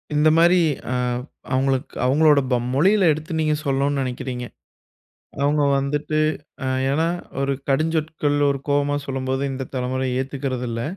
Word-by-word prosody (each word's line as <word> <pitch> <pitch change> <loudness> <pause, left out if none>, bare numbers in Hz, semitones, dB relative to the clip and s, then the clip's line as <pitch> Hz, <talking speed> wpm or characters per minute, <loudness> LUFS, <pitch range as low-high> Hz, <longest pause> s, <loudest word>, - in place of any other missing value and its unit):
இந்த 150 +1 +5
மாதிரி 175 +2 +5 0.3
அ - - 0 0.6
அவங்களுக்கு 130 0 0
அவங்களுடைய 145 +1 +4
போம் 120 0 +1
மொழியில 190 +4 +4
எடுத்து 155 +2 -5
நீங்க 155 -1 +2
சொல்லணுன்னு 140 0 +1
நினைக்கிறீங்க. 125 -1 -4 1.0
அவங்க 145 +1 +2 0.2
வந்துட்டு 150 +2 -1 0.5
அ - - -1 0.2
ஏன்னா, 160 +4 +1 0.3
ஒரு 140 0 +1 0.2
கடுஞ்சொற்கள் 155 0 0
ஒரு 140 - -1
கோவமா 145 0 +1
சொல்லும்போது, 135 0 -2
இந்த 130 -1 -4
தலைமுறை 130 +1 -1
ஏத்துக்கிறதில்ல. 130 -4 -3
140 Hz, 125 wpm, -22 LUFS, 130-155 Hz, 1.0 s, இந்த